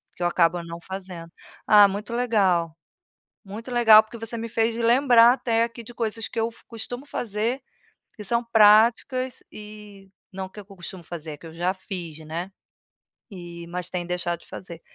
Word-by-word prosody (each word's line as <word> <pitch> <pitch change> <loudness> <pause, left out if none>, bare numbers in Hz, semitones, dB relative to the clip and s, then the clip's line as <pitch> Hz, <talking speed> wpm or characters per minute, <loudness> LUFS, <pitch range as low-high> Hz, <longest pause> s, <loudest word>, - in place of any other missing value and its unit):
que - - -13
eu - - +3
acabo 175 0 +2
não 170 0 -8
fazendo. 185 -3 -8 0.3
Ah, 210 -1 +8
muito 205 +3 -5
legal. 195 -9 +1 0.7
Muito 220 +5 -8
legal 225 -3 +7
porque 220 +2 -11
você 225 +1 -5
me 230 0 -4
fez 225 +1 0
lembrar 240 0 +6
até 230 -3 +1
aqui 235 0 -5
de 240 +2 -12
coisas 225 -1 -3
que 230 - -5
eu 225 +1 +1
f 230 - -20
costumo 245 +3 -7
fazer, 230 +2 -2 0.5
que 210 - -9
são 235 +4 0
práticas 235 +4 +4
e 210 -2 -12 0.2
não 190 -1 -6
que 210 - -12
eu 205 - -11
costumo 190 -2 -10
fazer, 165 -2 -7
é - - -10
que 165 - -15
eu 160 - -10
já 175 +3 -1
fiz, 180 -5 -7
né, 170 +5 -5 0.8
eh, 170 -2 -9
mas 180 +1 -6
tenho 175 -1 -3
deixado 175 -1 -2
de - - -19
fazer. 170 -3 -10
210 Hz, 180 wpm, -24 LUFS, 175-230 Hz, 0.8 s, Ah